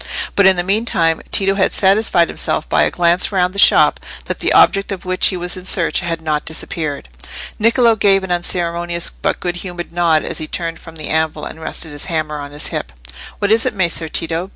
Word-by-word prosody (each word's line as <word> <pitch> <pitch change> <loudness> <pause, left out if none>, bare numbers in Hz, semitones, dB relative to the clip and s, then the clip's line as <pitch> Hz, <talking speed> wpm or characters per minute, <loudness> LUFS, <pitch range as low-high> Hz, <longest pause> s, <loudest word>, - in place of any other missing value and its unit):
But 200 -1 +5
in 190 - +6
the 175 - -1
meantime 185 -5 0
Tito 195 0 +2
had 195 -1 +1
satisfied 195 -3 +3
himself - - 0
by - - +2
a - - +3
glance 175 +2 +1
round 180 -2 +1
the 200 - -4
shop - - +5 0.3
that - - -4
the - - +1
object 195 0 +4
of 190 -2 -6
which 185 0 +2
he 185 - -1
was 175 +1 -1
in 185 - -8
search 180 -2 +1
had 165 -2 -4
not 150 -1 -1
disappeared. 155 - -3 0.5
Niccolò 230 0 +3
gave 195 -2 +3
an 190 - -5
unceremonious 175 -1 -1
but - - -3
good 175 0 -3
humoured 175 -2 -6
nod 170 -3 +2
as - - -2
he 155 - -3
turned 165 0 -4
from 165 -1 -13
the 155 -2 -5
anvil 160 0 -1
and 160 - -9
rested 160 0 -4
his 145 0 -5
hammer 155 -3 -3
on 145 0 -7
his 145 +1 -3
hip. 65 - -5 0.5
"What 205 0 0
is 225 +1 +4
it, 250 - -3
Messer 170 -3 -1
Tito? 165 +4 -2
175 Hz, 215 wpm, -17 LUFS, 160-190 Hz, 0.5 s, in